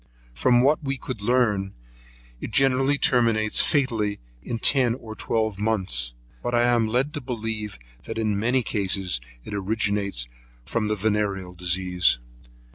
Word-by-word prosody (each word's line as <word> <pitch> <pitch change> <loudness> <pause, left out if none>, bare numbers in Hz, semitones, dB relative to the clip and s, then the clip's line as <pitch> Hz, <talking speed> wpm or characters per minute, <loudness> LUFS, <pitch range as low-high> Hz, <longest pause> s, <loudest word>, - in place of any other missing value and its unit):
From 120 - +3
what 150 +3 +3
we 135 0 -2
could 130 -4 -6
learn, 105 -4 +1 0.6
it - - -5
generally 135 +2 +3
terminates 115 -5 +3
fatally 115 -8 0 0.2
in 120 - -4
ten 125 -1 +3
or 110 -4 -9
twelve 110 -4 -1
months; 90 - -1 0.3
but 120 - -1
I 120 - +4
am 120 -2 +3
led 130 +6 0
to 145 - -3
believe, 110 - -4 0.3
that - - -5
in 105 -3 0
many 125 +4 +2
cases 95 - 0 0.2
it - - -8
originates 100 - -1 0.4
from 110 -2 -1
the 105 - 0
venereal 100 -3 -1
disease. 90 -4 +2
110 Hz, 140 wpm, -25 LUFS, 100-120 Hz, 0.6 s, I